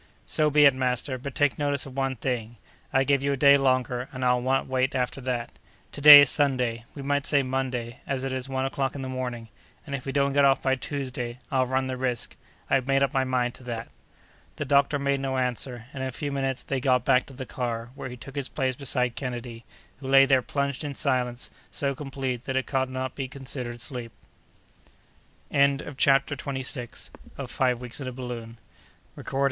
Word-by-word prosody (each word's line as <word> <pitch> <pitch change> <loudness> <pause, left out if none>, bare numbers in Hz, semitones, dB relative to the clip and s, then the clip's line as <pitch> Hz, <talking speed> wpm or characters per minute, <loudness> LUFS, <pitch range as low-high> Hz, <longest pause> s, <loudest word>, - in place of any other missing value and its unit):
"So 155 -1 +2
be 150 0 +6
it, 140 - +7
master; 130 0 -1
but 140 +2 -7
take 145 -3 +2
notice 145 -1 0
of 135 -2 -10
one 135 -1 0
thing: 120 -2 -3 0.3
I 135 0 +3
give 140 0 +2
you 140 0 +1
a - - -2
day 140 +1 +7
longer, 130 -2 +1
and 130 0 -3
I'll 125 0 +3
not 135 +2 +1
wait 130 +1 0
after 125 +1 -1
that. 125 -2 -3 0.4
To 145 - -8
day 145 0 +12
is 145 - +4
Sunday; 125 -5 0
we 140 - -7
might 145 +1 0
say 145 -2 +3
Monday, 130 -3 -3
as 135 -2 -2
it 135 -1 -2
is 130 +1 -4
one 130 0 -1
o'clock 135 0 -2
in 135 - -5
the - - -4
morning, 125 -3 -4 0.4
and 140 - -7
if 135 -1 -4
we - - -1
don't 140 0 +1
get 140 0 +4
off 135 -1 +5
by 130 - +1
Tuesday, 130 -3 -4
I'll 130 -2 +2
run 130 +1 0
the 130 -1 -3
risk. 125 -2 -2 0.3
I've 135 -1 +1
made 135 0 +3
up 140 - 0
my 135 -1 +2
mind 125 -2 0
to - - -13
that!" 115 -1 -5 0.7
The 150 - -4
doctor 140 +1 +3
made 140 0 0
no 135 -1 -2
answer, 125 -1 -2
and 135 - -5
in 130 - -2
a - - -6
few 145 +3 -4
minutes 135 -2 -2
they 135 - -2
got 125 -2 +2
back 125 - +3
to 135 - -11
the 130 0 -7
car, 120 -2 -4
where 130 - -7
he 125 - -8
took 135 +3 -10
his 140 -2 -3
place 130 -3 -1
beside 125 -2 +1
Kennedy, 120 -3 -6 0.3
who 135 - -8
lay 135 0 +7
there 135 -1 +4
plunged 140 +2 -2
in 145 -2 -4
silence 125 -3 -1 0.2
so 140 -1 -1
complete 135 -3 -4
that 130 -1 -1
it 130 - 0
could 130 -1 0
not 130 0 -4
be 135 -2 -4
considered 125 -3 -6
sleep. 120 -2 -5 1.4
CHAPTER 140 0 +2
TWENTY 135 -2 -4
SEVENTH. 125 -2 -4 0.3
Terrific 125 -2 -1
Heat.—Hallucinations. 125 -4 -5
130 Hz, 205 wpm, -26 LUFS, 125-140 Hz, 1.4 s, day